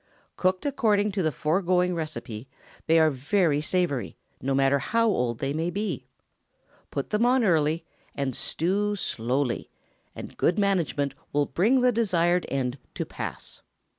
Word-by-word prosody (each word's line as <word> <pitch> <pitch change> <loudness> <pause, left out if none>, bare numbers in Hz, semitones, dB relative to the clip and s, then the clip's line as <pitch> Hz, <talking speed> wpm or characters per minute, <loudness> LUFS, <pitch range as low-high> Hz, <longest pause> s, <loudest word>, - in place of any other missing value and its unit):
Cooked 185 +3 0
according 210 -7 +2
to 195 0 -1
the 155 -3 +1
foregoing 180 +4 +1
receipt 130 -8 -5 0.4
they 165 +1 +5
are 160 -1 +5
very 150 +3 +1
savory, 155 - -1 0.2
no 135 +2 0
matter 135 +1 +3
how 230 +9 +1
old 125 - 0
they 135 +3 -2
may 165 +3 -1
be. 175 -9 -3 0.8
Put 140 - -4
them 210 +2 +2
on 250 +1 +4
early, 160 -4 +2 0.3
and 135 -3 -2
stew 205 +5 0
slowly, 125 - -1 0.5
and - - -9
good 175 - +2
management 170 -9 +1 0.2
will 145 0 +2
bring 230 - +2
the 250 0 +4
desired 180 -6 +2
end 130 -1 -2 0.2
to - - -2
pass. - - -6
165 Hz, 145 wpm, -26 LUFS, 140-200 Hz, 0.8 s, they